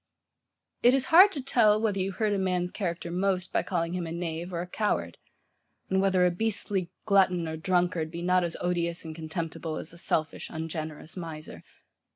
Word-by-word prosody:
It 245 +2 +6
is 265 -1 +2
hard 380 +4 +9
to 275 -4 -4
tell, 215 -5 +4
whether 210 -3 0
you 190 +1 -1
hurt 210 +2 0
a 200 - 0
man's 180 -1 0
character 170 -3 -3
most 185 0 0
by - - +3
calling 170 -2 -2
him 180 -2 -3
a - - -6
knave 170 +1 -4
or 170 -1 -2
a - - -4
coward, 210 +3 -1 0.7
and 190 0 +3
whether 190 -2 +3
a 180 - +3
beastly 195 -2 -1 0.2
glutton 185 -4 +3
or 160 - -3
drunkard 175 -1 0
be 170 +1 -6
not 180 0 +3
as 170 -1 -2
odious 170 -1 -1
and 160 - -6
contemptible, 160 0 -4
as 155 - -6
a 170 - -7
selfish, 155 -2 -1
ungenerous 160 -1 -5
miser. 160 -4 -8
180 Hz, 190 wpm, -28 LUFS, 165-195 Hz, 0.7 s, hard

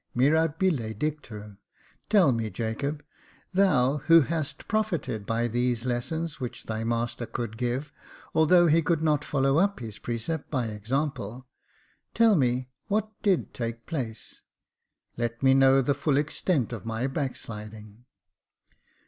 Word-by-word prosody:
Mirabile 150 -3 +2
dictu! 120 -10 -5 0.5
Tell 195 -9 +5
me, 115 -2 -1
Jacob, 125 +8 -3 0.5
thou 150 -8 +3
who 165 0 +8
hast 155 -1 -3
profited 175 - -1
by 115 +1 +1
these 120 0 0
lessons 150 +6 -2
which 125 -3 -5
thy 110 0 -3
master 120 +1 -2
could 115 -2 -4
give 125 +5 -2 0.2
— - - -22
although 175 +3 +5
he 165 0 +4
could 160 0 0
not 150 -2 +2
follow 135 +1 +2
up 200 +2 +1
his 110 -3 -7
precept 120 +7 -3
by 130 -5 0
example 120 +2 -3 0.3
— - - -39
tell 225 -2 +5
me, 125 -4 +1 0.2
what 215 +1 0
did 195 -5 +1
take 115 -1 -4
place 120 -8 -5 0.4
} - - -46
Let 120 +1 -2
me 130 0 +6
know 135 0 +5
the 140 - +2
full 140 0 +1
extent 145 - 0
of 110 -6 -6
my 115 +2 -2
backsliding." 110 -5 -6
130 Hz, 140 wpm, -27 LUFS, 115-155 Hz, 0.5 s, who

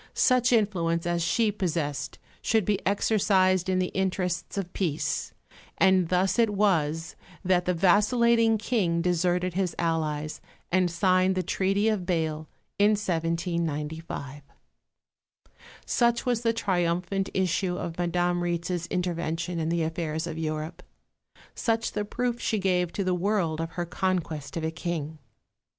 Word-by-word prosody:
Such 255 -1 +3
influence 175 -7 +1
as 175 0 0
she 215 +6 +2
possessed 150 -8 -2 0.2
should 220 -3 +2
be 205 0 0
exercised 190 -2 +2
in 185 - +2
the 185 0 0
interests 185 -1 -2
of 185 -2 -4
peace, 160 -6 -1 0.5
and 190 -3 +4
thus 185 +5 +2
it 230 -2 +4
was 165 -6 0 0.3
that 180 -1 +2
the 180 - +1
vacillating 225 +5 +4
King 190 -7 0
deserted 180 +1 +1
his 185 -2 -1
allies, 155 -2 -1 0.3
and 185 0 +3
signed 185 +2 +2
the 185 - 0
Treaty 195 +4 +1
of 215 -2 +2
Bâle, 160 -4 -2 0.3
in 205 +1 +5
1795. 165 -5 -3 1.4
Such 235 0 +2
was 245 -2 +1
the 230 -1 +2
triumphant 185 -2 0
issue 185 0 0
of 170 0 -5
Madame 175 0 +1
Rietz's 175 0 -2
intervention 170 -1 -2
in 160 0 -1
the 170 -1 +1
affairs 160 -1 -2
of 170 - -5
Europe; 155 +1 -4 0.7
such 230 -1 0
the 210 -1 -2
proof 240 +2 -2
she 220 - 0
gave 180 -3 +1
to 200 - -1
the 185 -1 +1
world 180 -4 0
of 165 0 -5
her 175 -1 -2
conquest 170 -4 -2
of 165 - -3
a 160 - -1
King. 160 -2 -4
180 Hz, 140 wpm, -27 LUFS, 165-195 Hz, 1.4 s, in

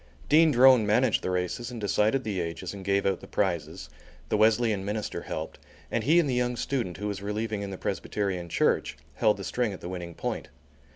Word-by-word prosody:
Dean 160 +2 +6
Drone 130 -3 +6
managed 115 +2 +3
the - - -2
races 90 +6 -2
and 120 -2 -7
decided 105 +5 +1
the 100 -5 -2
ages 85 +3 -5
and 100 -1 -8
gave 100 +1 +1
out 95 -2 +1
the - - -12
prizes; 90 -5 -2 0.4
the - - +1
Wesleyan 110 -1 +3
minister 105 +1 -3
helped, - - -6 0.3
and - - 0
he 160 +5 +5
and 165 - +2
the 130 - 0
young 125 0 0
student, 120 -8 -2
who 105 +2 -4
was 100 -1 -4
relieving 105 +1 -3
in 100 - -4
the 95 - -6
Presbyterian 95 -4 -3
Church, - - +1 0.2
held 110 -3 +3
the 100 - -7
string 120 0 -1
at 95 - -8
the 85 - -6
winning 90 -2 -6
point. - - -4
105 Hz, 210 wpm, -27 LUFS, 95-120 Hz, 0.4 s, Dean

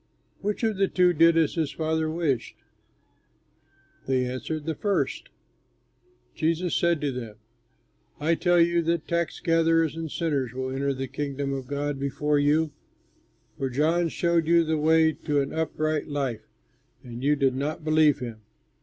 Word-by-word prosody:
Which 210 +3 -3
of 220 -3 +1
the 195 0 +3
two 180 -1 +3
did 165 +1 +5
as 160 -2 +2
his 160 -4 -1
father 160 0 -1
wished?" 155 -7 -1 1.5
They 130 -1 +1
answered, 145 +5 -4
"The 160 - -1
first." 200 +5 -1 1.0
Jesus 165 +2 0
said 170 -2 +2
to 145 -2 0
them, 115 -4 -7 0.8
"I 155 +3 +2
tell 175 +1 +2
you 170 0 +3
that 165 -1 -1
tax 170 -1 -1
gatherers 165 -2 +2
and 165 -1 -5
sinners 140 -8 -1
will 130 0 -3
enter 140 +1 -1
the 135 0 -4
Kingdom 140 +1 -3
of 135 -2 -5
God 145 0 -3
before 145 +2 0
you; 150 +2 +2 0.9
for 135 - -1
John 160 +6 +1
showed 170 -1 +1
you 170 0 +5
the 160 -1 -1
way 160 +1 +4
to 150 -2 -1
an 140 0 -2
upright 155 -1 -1
life, 140 -6 -3 0.6
and 120 +1 -8
you 145 +1 +3
did 135 -2 +2
not 150 +4 -3
believe 155 -2 +4
him. 115 -3 -7
155 Hz, 155 wpm, -26 LUFS, 140-165 Hz, 1.5 s, did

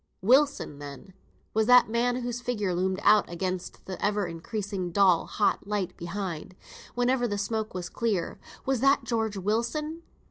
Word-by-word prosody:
Wilson! 260 - +3
then, 145 +6 -10 0.4
was 220 0 +2
that 250 0 +7
man 235 +2 +1
whose 245 0 -3
figure 210 -7 -1
loomed 185 +2 0
out 210 0 +5
against 185 +1 -4
the 185 - -6
ever 205 -1 +1
increasing 190 +2 -4
dull 185 -2 +4
hot 205 -1 0
light 200 -3 -2
behind, 175 -1 -5 0.4
whenever 245 0 +2
the 205 -2 -2
smoke 215 0 -2
was 180 -1 -3
clear, 200 -5 -2 0.3
was 265 -2 +1
that 275 +1 +4
George 225 -3 -1
Wilson? 235 - -1
210 Hz, 150 wpm, -28 LUFS, 185-240 Hz, 0.4 s, that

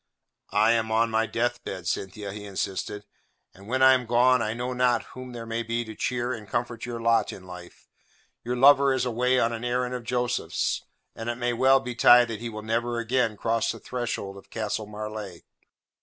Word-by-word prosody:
"I 110 +2 +5
am 110 -1 +1
on 115 +1 +2
my 110 0 +1
death 120 +2 -1
bed, 95 -2 -6
Cynthia," 100 +2 -3
he 105 0 -8
insisted, 100 +1 -4 0.5
"and 100 +3 -15
when 130 +3 +1
I 130 0 +8
am 125 -2 0
gone 125 +1 +4
I 110 0 -1
know 125 +2 -3
not 125 -1 +2
whom 130 0 -8
there 120 -1 -7
may 115 0 -2
be 115 +1 -2
to 110 - -8
cheer 120 +2 -2
and 110 -4 -9
comfort 120 0 -3
your 120 -1 -4
lot 115 0 +2
in 95 - -11
life. 90 -1 -12 0.6
Your 125 +1 -2
lover 140 +1 +6
is 130 - 0
away 125 +2 +1
on 115 0 +1
an 115 0 -5
errand 125 +1 -1
of 125 -1 -4
Joseph's, 125 +1 -1 0.3
and 115 +1 -5
it 120 - -1
may 120 0 -1
well 135 +3 +5
betide 120 -1 +5
that 110 -2 -4
he 120 - -4
will 110 -1 -7
never 115 +2 -1
again 115 -2 0
cross 115 +2 0
the - - -10
threshold 120 -6 -4
of 100 - -15
Castle 105 -1 -3
Marleigh. 105 -4 -7
115 Hz, 200 wpm, -26 LUFS, 110-125 Hz, 0.6 s, I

